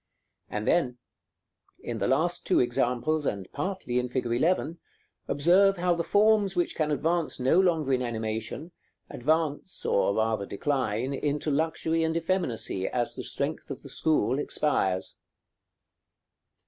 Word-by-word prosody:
And 105 0 -4
then, 130 -8 +2 0.9
in - - -4
the - - 0
last 160 +6 +1
two 185 - +4
examples 125 +5 +1
and 100 -2 -3
partly 165 -6 -2
in 125 0 -2
fig. 125 0 -2
11, 160 +7 0 0.5
observe 185 +7 +4
how 175 0 +2
the 170 0 -1
forms 205 -1 +3
which 175 -1 0
can 155 -1 0
advance 160 +2 0
no 130 +8 +4
longer 160 -7 +2
in 125 - +1
animation, 115 +6 -4 0.4
advance, 155 +5 -1
or 100 0 +2
rather 110 -2 0
decline, 130 0 -1
into 145 +2 -1
luxury 160 +2 0
and 160 0 0
effeminacy 165 - -1
as 120 -1 -1
the - - -5
strength - - -3
of - - -7
the - - -10
school 135 -5 +1
expires. 95 -12 0
145 Hz, 135 wpm, -27 LUFS, 120-170 Hz, 0.9 s, two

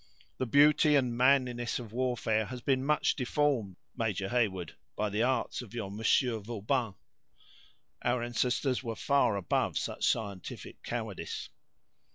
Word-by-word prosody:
The 130 - -1
beauty 150 +3 +5
and 125 -4 +2
manliness 125 -2 +2
of 115 -3 -8
warfare 120 -3 0
has 125 0 -6
been 130 +1 +1
much 150 +2 +2
deformed, 125 -7 0 0.2
Major 100 -4 -1
Heyward, 100 -8 0 0.2
by 105 -1 -1
the 105 +2 0
arts 125 0 0
of 120 -2 -11
your 105 -5 -4
Monsieur 110 +3 +2
Vauban. 110 +1 -2 1.1
Our 120 0 0
ancestors 125 +2 0
were 115 -3 -4
far 140 -4 +2
above 95 -4 0
such - - -3
scientific 100 -5 -3
cowardice!" - - -5
120 Hz, 135 wpm, -31 LUFS, 110-130 Hz, 1.1 s, beauty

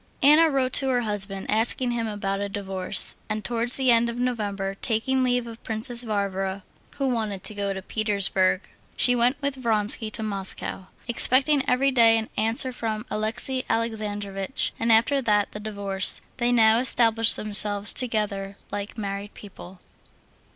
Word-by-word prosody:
Anna 305 +3 +6
wrote 260 -3 -1
to 270 -1 +4
her 250 -1 +1
husband 200 -3 +2
asking 240 +3 +2
him 230 -1 -2
about 200 -2 -3
a 200 0 -3
divorce, 195 -1 -2
and 215 -1 -4
towards 240 +2 -1
the 260 -2 +2
end 235 0 +3
of 235 - -6
November, 205 -6 -3
taking 255 +4 0
leave 245 -1 +1
of 230 0 -10
Princess 230 +2 -3
Varvara, 195 -3 -3 0.3
who 275 -1 -1
wanted 215 -6 -3
to - - -3
go 200 -1 -3
to 190 -1 -6
Petersburg, 200 -3 0 0.4
she 245 - +3
went 245 +3 +1
with 280 0 -1
Vronsky 215 -1 0
to 220 +1 -4
Moscow. 195 -2 -4 0.2
Expecting 265 +4 +4
every 270 +2 +2
day 230 -3 +5
an 220 -1 -4
answer 225 +4 +2
from 220 -2 -4
Alexey 220 +5 -1
Alexandrovitch, 210 -2 -2
and 230 0 +1
after 230 +5 +3
that 210 -4 +1
the 210 - -7
divorce, 200 -3 0 0.2
they 240 -1 0
now 225 -1 +4
established 230 -2 +3
themselves 205 -1 +2
together 205 -5 -1
like 205 +2 -6
married 200 -1 -6
people. 190 -2 -12
220 Hz, 160 wpm, -24 LUFS, 200-240 Hz, 0.4 s, Anna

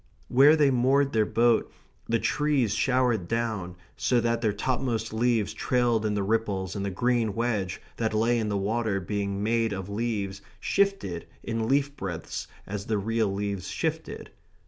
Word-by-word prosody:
Where 140 +5 +7
they 145 -3 +4
moored 135 +3 +3
their 110 -2 +2
boat 115 -1 +2 0.4
the 115 - +3
trees 145 -4 +1
showered 125 -8 +1
down, 110 -6 -2 0.2
so 125 - +2
that 115 0 0
their 110 -3 +2
topmost 115 0 -2
leaves 115 -2 +1
trailed 120 -3 +1
in 105 - -1
the 100 - 0
ripples 100 -3 -1
and 100 - -2
the 100 - -1
green 115 +1 0
wedge 110 -6 -1 0.2
that 110 -1 0
lay 115 +2 +2
in 110 -2 -1
the 100 - 0
water 105 0 0
being 100 +1 -2
made 115 0 +1
of 95 0 -5
leaves 100 -3 -2 0.2
shifted 195 - 0 0.2
in 115 -1 -2
leaf 140 +2 +1
breadths 85 - -5 0.2
as 100 0 -5
the 110 - +1
real 110 0 0
leaves 100 -1 -3
shifted. - - -3
115 Hz, 165 wpm, -27 LUFS, 100-120 Hz, 0.4 s, Where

